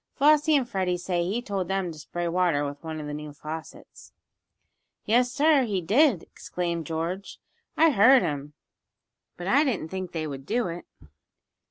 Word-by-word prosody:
Flossie 300 +2 +4
and 265 -4 +2
Freddie 185 -4 -1
say 175 -1 -1
he 230 +6 -2
told 195 -5 -3
them 190 -2 -1
to 155 - -11
spray 175 +3 -4
water 170 -4 +1
with 145 +1 -7
one 160 -1 -5
of 150 - -6
the 150 - -5
new 150 0 -6
faucets." 155 +2 -9 0.9
"Yes, 245 +3 +3
sir, 300 0 +4
he 200 -4 -1
did!" 215 - +3
exclaimed 170 -3 -4
George. 170 +4 -4 0.4
"I 325 0 +5
heard 250 +1 +6
him, 145 -3 -4 0.8
but 175 - -7
I 275 +10 +4
didn't 225 - -2
think 185 -1 -5
they 160 -2 -3
would 135 -2 -7
do 230 -2 0
it. 170 +1 -7
180 Hz, 170 wpm, -26 LUFS, 160-240 Hz, 0.9 s, heard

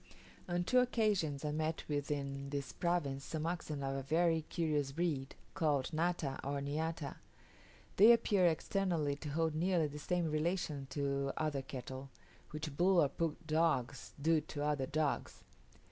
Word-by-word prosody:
On 175 0 +1
two 250 +8 +4
occasions 205 - +1
I 150 - 0
met 155 +1 -1
with 145 -1 -2
in 140 -1 -3
this 140 -1 -3
province 150 -6 0
some 155 +1 -3
oxen 160 -4 -3
of 135 0 -1
a 135 - -2
very 165 +3 +2
curious 150 -5 0
breed, 145 -4 -2 0.2
called 150 -2 +1
nata 160 -4 0
or 140 +1 -1
niata. 150 +2 -3 0.8
They 215 +4 +9
appear 210 -6 +4
externally 165 -3 0
to 150 - -6
hold 160 +2 +1
nearly 170 +1 +2
the 150 0 -5
same 175 0 0
relation 155 -3 -1
to 140 -1 -1
other 150 -3 0
cattle, 130 0 -7 0.4
which 150 -1 -5
bull 180 +3 +4
or 145 - +4
pug 165 0 -1
dogs 155 -5 0
do 160 +2 +3
to 145 -1 -5
other 145 -3 0
dogs. 150 0 -1
155 Hz, 155 wpm, -35 LUFS, 140-170 Hz, 0.8 s, They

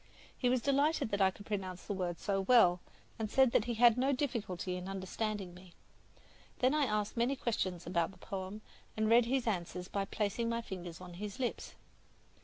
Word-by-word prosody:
He 250 - +1
was 250 -1 +1
delighted 285 -2 +2
that 200 0 0
I 190 - +6
could 205 +2 -11
pronounce 190 -3 -4
the 205 - -2
words 180 -3 -3
so 195 -2 +1
well, 190 -5 +5 0.4
and 220 -1 -2
said 265 +1 +4
that 215 - +3
he 240 - -2
had 240 +1 +6
no 270 +2 +3
difficulty 210 - -2
in 180 0 -6
understanding 195 0 -3
me. 180 0 -15 0.8
Then 255 +1 +3
I 300 -2 +3
asked 210 -3 -1
many 240 +4 +2
questions 185 -9 -2
about 170 -2 +1
the 190 - -15
poem, 195 +2 -6 0.4
and 220 0 +2
read 235 0 +6
his 255 +1 0
answers 180 -4 -2
by 200 0 -2
placing 215 +3 -1
my 230 0 -1
fingers 180 -5 -7
on 180 -1 -9
his 205 +4 -6
lips. 250 -2 -3
210 Hz, 195 wpm, -34 LUFS, 185-235 Hz, 0.8 s, I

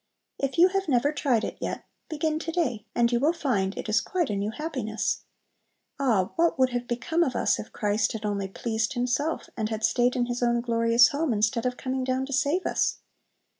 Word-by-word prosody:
If 275 +2 -2
you 355 +2 +7
have 390 +1 -1
never 280 +1 +2
tried 270 -7 +1
it - - -4
yet, - - -4 0.2
begin 310 0 -1
to 330 - -4
day, 265 -11 -1
and 235 0 +3
you 240 - +2
will 300 +6 +3
find 210 - -1
it - - -5
is 215 +1 +2
quite 345 -10 -1
a - - -1
new 200 +1 -1
happiness. 235 -4 -3 0.7
Ah, 225 -9 +2
what 335 -2 +3
would 260 -1 +3
have 245 0 -3
become 320 +8 -1
of 265 -7 +1
us - - +2
if 215 - -8
Christ 210 +1 0
had 220 -1 -5
only 200 -2 -1
"pleased 220 +4 -2
Himself," 255 +6 -1
and 215 -2 -2
had 220 0 -1
stayed 245 +2 +2
in 245 -1 +1
His 245 0 -3
own 240 0 +2
glorious 230 0 +4
home 295 0 -1
instead 220 +3 +1
of 250 0 -3
coming 260 0 -2
down 260 +1 0
to 280 - -6
save 290 +7 +1
us! - - +1
245 Hz, 210 wpm, -26 LUFS, 225-290 Hz, 0.7 s, you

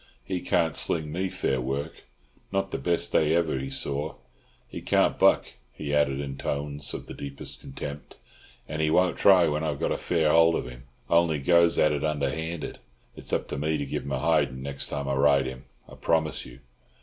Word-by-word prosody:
He 90 +8 -3
can't 80 -2 +1
sling 80 -2 0
me 95 +4 -1
fair 65 -7 -1
work, 70 +4 -4 0.5
not 95 0 -1
the - - -2
best 85 -1 0
day 80 +1 +3
ever 80 -5 +1
he 65 +1 -4
saw. 70 +3 -2 0.5
He - - -7
can't - - +2
buck," - - +5 0.3
he 70 -1 -5
added, 70 -2 +2
in 70 -1 -5
tones 70 0 -3
of - - -7
the - - -8
deepest 70 -1 -8
contempt, 70 +2 -8 0.5
"and 75 +1 -3
he 80 - +2
won't 90 +3 +3
try 95 -4 +6
when 75 +1 -1
I've 75 -3 -2
got - - 0
a - - 0
fair 80 -3 +1
hold 80 0 +5
of - - -2
him; - - -11 0.2
only 85 -1 +3
goes 85 +4 +4
at 75 - +4
it 75 - -2
underhanded. 80 +2 -2 0.4
It's - - -4
up - - 0
to - - -3
me 75 +1 0
to 70 - -3
give 70 - -3
him 70 - -7
a 65 - 0
hidin' 70 -4 +1
next 70 0 -4
time 70 0 -4
I 70 - 0
ride 70 0 +4
him, 65 +1 -7 0.2
I - - -14
promise 80 -1 0
you." 60 +1 -14
75 Hz, 205 wpm, -27 LUFS, 70-80 Hz, 0.5 s, try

